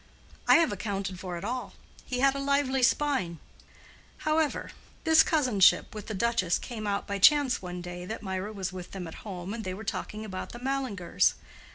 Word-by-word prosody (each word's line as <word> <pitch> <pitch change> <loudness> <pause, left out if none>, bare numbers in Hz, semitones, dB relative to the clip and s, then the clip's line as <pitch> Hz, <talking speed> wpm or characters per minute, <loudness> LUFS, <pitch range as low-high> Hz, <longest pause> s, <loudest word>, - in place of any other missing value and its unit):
I - - +8
have 335 -2 +4
accounted 195 -3 -3
for 180 -2 -5
it 170 - -7
all—he 250 0 -5
had 275 0 +5
a 275 - -4
lively 275 -1 +1
spine. 250 - +2 0.9
However, 310 -1 +1 0.3
this 320 -1 +7
cousinship 250 - +4
with 210 -2 -7
the 220 - -4
duchess 195 -4 +1
came 220 -3 -6
out 200 0 -1
by 200 0 -3
chance 285 +3 +5
one 180 -1 -6
day 175 0 -7
that 220 +2 -5
Mirah 190 +1 -3
was 190 -3 -4
with 180 -1 -8
them 190 -2 -5
at 160 - -8
home 190 -1 -6
and 230 -1 -5
they 185 -2 -4
were 215 - -8
talking 215 0 -4
about 185 -3 -6
the 240 - -8
Mallingers. 255 -8 0
215 Hz, 185 wpm, -28 LUFS, 185-265 Hz, 0.9 s, I